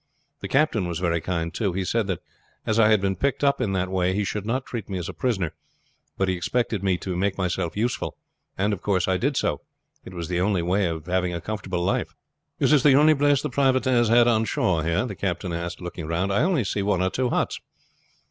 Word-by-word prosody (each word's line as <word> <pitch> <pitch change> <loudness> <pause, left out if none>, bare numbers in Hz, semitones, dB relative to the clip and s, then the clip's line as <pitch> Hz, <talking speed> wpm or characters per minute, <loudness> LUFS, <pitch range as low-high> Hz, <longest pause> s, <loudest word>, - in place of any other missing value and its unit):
The - - -5
captain 135 - +2
was 85 -2 -3
very 85 -1 0
kind 85 -1 -2
too. 100 -1 -1
He 95 +1 -2
said 115 +1 0
that 95 -3 -2 0.4
as 110 +1 +1
I 110 - +6
had 110 -3 +4
been 95 -1 0
picked 140 +4 -1
up 140 -2 +3
in 110 -5 0
that 95 -1 0
way 95 0 +1
he 105 - +1
should 105 +1 -3
not 130 +3 -1
treat 115 -5 -6
me 95 - -3
as 90 -1 -4
a 95 - -6
prisoner; 95 -8 -1 0.6
but 95 - +1
he 95 - +1
expected 110 +3 -1
me 95 -2 +2
to 90 0 -4
make 95 +2 0
myself 90 -1 -2
useful, 120 +3 -2 0.4
and, 100 +2 +1
of 95 - -5
course, 95 -4 +1
I 95 -1 +2
did 140 +7 0
so. - - 0 0.4
It 90 - -11
was 85 -2 -4
the 90 -1 -1
only 95 -2 +1
way 95 +2 +1
of 80 -2 -4
having 90 -1 0
a - - -3
comfortable 95 -2 -3
life." - - -1 0.4
"Is - - +3
this 150 -3 +5
the 140 -1 +6
only 150 +2 +6
place 145 -1 +2
the 150 - -3
privateers 130 -3 +2
had 120 +1 +5
on 115 -2 +3
shore 90 -6 0
here?" 85 +8 +1
the 115 - -5
captain 90 -2 -3
asked, 85 +1 -4
looking 90 -2 -6
round. 90 +4 0
"I 100 - +2
only 165 -5 +2
see 100 0 -2
one 100 -2 +1
or 95 - 0
two 125 -1 0
huts." - - -1
95 Hz, 240 wpm, -24 LUFS, 90-120 Hz, 0.6 s, I